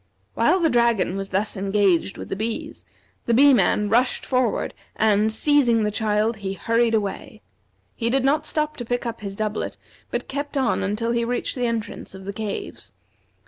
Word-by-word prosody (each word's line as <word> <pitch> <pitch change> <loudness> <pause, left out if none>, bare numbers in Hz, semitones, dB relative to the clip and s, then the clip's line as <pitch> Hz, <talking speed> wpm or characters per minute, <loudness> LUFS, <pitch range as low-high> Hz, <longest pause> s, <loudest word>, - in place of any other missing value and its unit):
While 375 - +3
the 330 -2 +3
dragon 235 -6 +2
was 195 0 -4
thus 200 +3 -1
engaged 195 -2 +1
with - - -8
the - - -2
bees, 220 +3 -4 0.4
the 235 - +3
Bee 280 +3 +7
man 210 -1 +3
rushed 240 +5 +1
forward, 255 -4 0 0.2
and, 215 0 +3
seizing 240 -2 +3
the 210 - 0
child, 215 +1 0
he 195 -1 -4
hurried 230 +2 +1
away. 205 -3 -4 0.5
He 230 -1 -1
did 265 +1 +2
not 300 +3 +2
stop 305 0 -1
to 245 - -4
pick 245 +1 -2
up 230 -2 -4
his 200 -1 -5
doublet, 215 0 -3 0.3
but - - -3
kept 285 +1 -4
on 260 -3 +1
until 210 +4 -1
he 235 0 +1
reached 245 +1 -1
the 250 -2 -1
entrance 225 -4 -4
of 190 0 -10
the 200 - -4
caves. 215 0 -6
225 Hz, 185 wpm, -23 LUFS, 205-245 Hz, 0.5 s, Bee